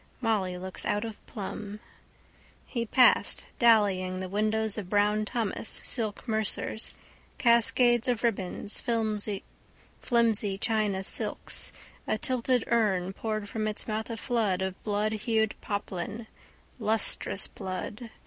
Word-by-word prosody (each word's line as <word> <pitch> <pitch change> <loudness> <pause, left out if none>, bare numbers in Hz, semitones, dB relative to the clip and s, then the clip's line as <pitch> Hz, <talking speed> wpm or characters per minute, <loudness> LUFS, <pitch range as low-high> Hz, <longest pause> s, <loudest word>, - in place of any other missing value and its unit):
Molly 205 -7 0
looks 185 +1 -5
out 205 +2 0
of 220 -2 -8
plumb. 210 0 -6 0.9
He 235 -3 -3
passed, 250 +2 +4
dallying, 200 -6 +4
the 185 - -3
windows 215 +2 +1
of 185 -4 -7
Brown 210 +1 +2
Thomas, 220 -1 -3
silk 220 -1 -3
mercers. 220 0 -1 0.5
Cascades 240 0 +4
of 245 -2 0
ribbons. 200 -3 -1 1.2
Flimsy 220 -4 +2
China 210 -3 0
silks. - - -1 0.4
A - - +1
tilted 250 0 +1
urn 195 -5 +1
poured 215 0 -3
from 215 +1 -2
its 210 - -4
mouth 220 +1 -2
a 230 - -4
flood 210 -6 0
of 190 0 -1
bloodhued 215 +1 +1
poplin: 205 +2 -4 0.5
lustrous 215 -2 +3
blood. 200 +5 -6
215 Hz, 115 wpm, -29 LUFS, 200-230 Hz, 1.2 s, passed